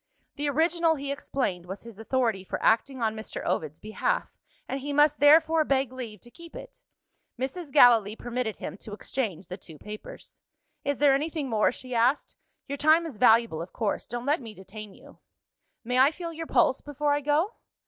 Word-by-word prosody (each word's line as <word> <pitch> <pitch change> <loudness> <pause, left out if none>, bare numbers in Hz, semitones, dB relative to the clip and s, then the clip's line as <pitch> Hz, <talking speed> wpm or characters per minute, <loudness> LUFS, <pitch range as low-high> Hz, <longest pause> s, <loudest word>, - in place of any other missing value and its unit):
The 290 0 -1
original 325 +2 +2
(he 280 -1 -4
explained) 255 -11 -3
was 190 +2 -7
his 230 -3 -12
authority 225 -4 0
for - - -4
acting 250 +3 +2
on 220 -1 0
Mr. 220 0 -6
Ovid's 155 -1 -2
behalf, - - -2 0.3
and 270 - -3
he 285 +2 -5
must 295 +1 +3
therefore 315 +2 +6
beg 270 -3 0
leave 230 -6 -7
to 240 - -16
keep 335 +3 -13
it. - - -11 0.6
Mrs. 280 +4 -4
Gallilee 230 -7 +6
permitted 240 -3 -3
him - - -7
to 205 - -10
exchange 210 -5 -4
the 185 - -6
two 165 -5 -13
papers. 210 +6 -11 0.4
"Is 285 -1 -1
there 285 -1 +5
anything 295 0 -1
more?" 215 -1 +3
she 255 0 -8
asked. 240 +5 +1 0.3
"Your 280 0 -5
time 315 +3 +4
is 290 -9 -7
valuable 225 -7 +4
of 175 - -8
course. 215 -4 -2
Don't 240 0 -5
let 290 +1 +1
me 225 -3 -9
detain 205 +1 -10
you." - - -17 0.6
"May 250 +2 0
I 265 +2 +7
feel 335 +1 -7
your 325 0 -6
pulse 255 +1 +3
before 290 0 -2
I 290 - 0
go?" 300 +9 +1
260 Hz, 190 wpm, -27 LUFS, 220-295 Hz, 0.6 s, I